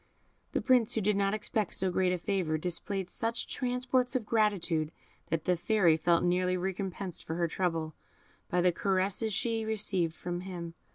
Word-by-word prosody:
The - - +1
Prince, 250 -4 +3
who 220 - +1
did 210 +1 +2
not 200 +1 +1
expect 215 -1 -1
so 190 0 +1
great 185 0 +2
a 180 - +1
favour, 175 -3 -1
displayed 180 +3 -3
such 230 +5 -1
transports 250 0 0
of 245 -4 0
gratitude 190 -8 +1 0.4
that 160 -1 -1
the 180 - +3
Fairy 175 -2 +3
felt 170 +1 +2
nearly 180 +1 +2
recompensed 190 -1 -3
for 160 - -4
her 170 0 +1
trouble 165 -2 -1 0.6
by 180 - +2
the 180 0 +4
caresses 195 +4 0
she 225 +2 0
received 200 -6 0
from 175 0 -4
him. 175 -3 -6
185 Hz, 170 wpm, -31 LUFS, 175-215 Hz, 0.6 s, the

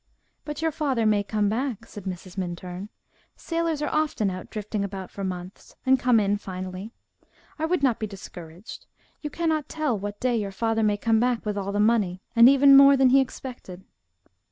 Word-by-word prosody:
"But 295 +1 -5
your 320 - +2
father 270 -7 -1
may 210 -1 +3
come 205 +1 -1
back," 230 +1 -2
said 205 -4 -11
Mrs. 185 -1 -7
Minturn; 180 +1 -5 0.5
"sailors 330 -3 -2
are 295 - -2
often 300 -10 0
out 185 0 -7
drifting 210 -1 -4
about 195 -2 -6
for 200 - -6
months, 180 0 -7
and 265 0 +4
come 245 -2 +4
in 205 0 +1
finally. 185 +1 -7 0.7
I 315 - 0
would 340 -2 0
not 250 -5 +2
be 215 - -2
discouraged 180 -2 -11 0.3
you 300 - -4
cannot 315 -3 -1
tell 305 -6 -1
what 205 +1 -6
day 250 -1 +1
your 210 -3 -1
father 225 +3 0
may 210 -1 +2
come 225 +1 +2
back 245 -1 0
with 210 -1 -2
all 200 -1 -3
the 205 - -1
money, 210 -4 +1
and 235 +2 +8
even 275 0 +7
more 275 0 +8
than 265 -1 +5
he 270 +2 +6
expected." 245 -8 -7
220 Hz, 190 wpm, -25 LUFS, 195-265 Hz, 0.7 s, and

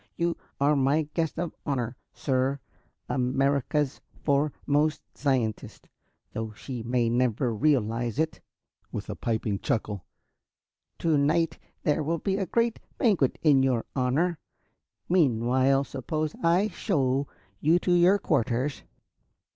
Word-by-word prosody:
You 170 0 0 0.2
are 145 +2 +4
my 140 +3 +3
guest 160 -3 -1
of 175 -2 -2
honor, 125 -4 -2 0.2
sir 135 0 0 0.5
America's 135 +3 0 0.2
foremost 145 +1 +1
scientist, 130 -7 -2 0.4
though 110 -1 -4
she 125 +3 -6
may 120 +1 +1
never 120 0 +1
realize 120 -3 +1
it," 160 +1 -1 0.5
with - - -5
a - - -5
piping 110 -3 -1
chuckle. 105 -4 -2 0.9
"To 160 -3 +2
night 160 +3 +1 0.2
there 150 0 +2
will 165 +3 0
be 190 +4 -1
a 195 -2 -1
great 230 +4 +1 0.2
banquet 190 - +2
in 145 -4 +5
your 130 -3 +1
honor. 145 +6 +1 0.7
Meanwhile, 130 -4 +3
suppose 155 +3 -3
I 175 +5 +3
show 140 - 0 0.3
you 160 +3 +4
to 180 - -1
your 175 +3 +5
quarters." 135 - 0
140 Hz, 120 wpm, -27 LUFS, 125-160 Hz, 0.9 s, in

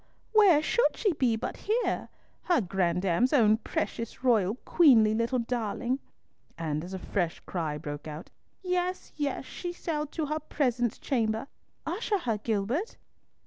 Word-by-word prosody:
Where 385 -9 +6
should 475 - +2
she 410 -5 +2
be 255 -6 +2
but 220 - -4
here? 460 +3 -1 0.4
Her 350 -3 +3
grandame's 185 - +1
own 220 -6 +5
precious, 230 +1 -4
royal, 220 -5 +3
queenly 235 -10 +6
little 230 +3 +1
darling!" 240 +1 -1 0.6
and 155 -2 -2
as 185 +2 -6
a - - -3
fresh 180 -2 -2
cry 160 -5 -3
broke 145 0 -6
out, 155 +2 -8 0.3
"Yes, 360 0 -1
yes; 285 -3 -2
she 350 +6 -5
shall 310 -3 -3
to 310 +2 -3
her 305 +2 -2
presence 245 -7 0
chamber. 225 -4 0 0.4
Usher 410 +5 -1
her, 230 - -2
Gilbert." 225 - -1
240 Hz, 145 wpm, -29 LUFS, 200-310 Hz, 0.6 s, Where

